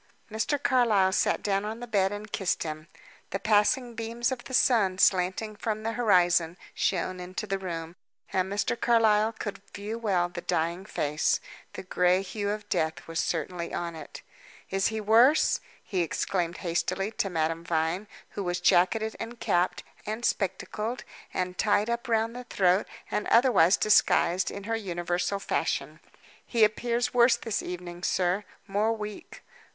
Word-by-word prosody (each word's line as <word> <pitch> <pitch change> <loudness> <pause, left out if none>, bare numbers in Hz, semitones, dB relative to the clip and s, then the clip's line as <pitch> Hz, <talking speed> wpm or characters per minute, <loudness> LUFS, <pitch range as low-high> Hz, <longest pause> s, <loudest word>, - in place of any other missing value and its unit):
Mr. 220 +7 0
Carlyle 225 -9 +3
sat 190 - +1
down 195 -1 +1
on 220 +2 -5
the 245 - -6
bed 200 -4 +1
and 205 0 -7
kissed 190 -3 -1
him. 155 0 -6 0.4
The - - -2
passing 215 +4 +2
beams 230 +2 -2
of 255 -2 -5
the 260 - -9
sun, 205 -9 +3
slanting 190 +4 +2
from 215 0 -3
the 225 - -1
horizon, 180 -7 +3 0.2
shone 185 0 -1
into 185 +4 -5
the 195 -1 -2
room, 170 -2 -5 0.4
and 185 0 0
Mr. 205 +3 0
Carlyle 220 -2 +3
could 205 -3 -6
view 210 +3 -5
well 190 -6 +1
the 175 0 -7
dying 170 +2 -1
face. 150 -6 0 0.3
The - - -7
gray 180 0 +2
hue 200 +1 -3
of 210 0 -4
death 160 -5 -1
was 165 -1 -3
certainly 170 +1 -2
on 170 -1 -3
it. 155 -2 -10 0.5
"Is 195 0 +2
he 220 -1 -2
worse?" 230 +8 +4 0.2
he 185 -4 -1
exclaimed 175 +1 -1
hastily, 185 +4 -1
to 200 - -1
Madame 165 -1 -1
Vine, 170 +4 -1 0.2
who 200 - -4
was 175 0 -1
jacketed, 215 +5 +3
and 230 +1 -7
capped, 175 +1 0 0.2
and 220 +3 -3
spectacled, 210 +5 -2 0.3
and 180 0 -3
tied 210 +1 +2
up 235 0 -3
round 225 0 +1
the 250 0 -7
throat, 185 -3 +2 0.2
and 210 - -1
otherwise 220 -8 +5
disguised, 190 -3 +3
in 200 - -7
her 225 +2 -1
universal 175 -2 -2
fashion. 195 - -2 0.4
"He 230 -3 +2
appears 235 +3 +1
worse 240 0 +5
this 225 -3 -2
evening, 175 -1 -7
sir 185 +2 0 0.2
more 210 +3 +1
weak." 210 -2 -8
200 Hz, 160 wpm, -28 LUFS, 180-225 Hz, 0.5 s, otherwise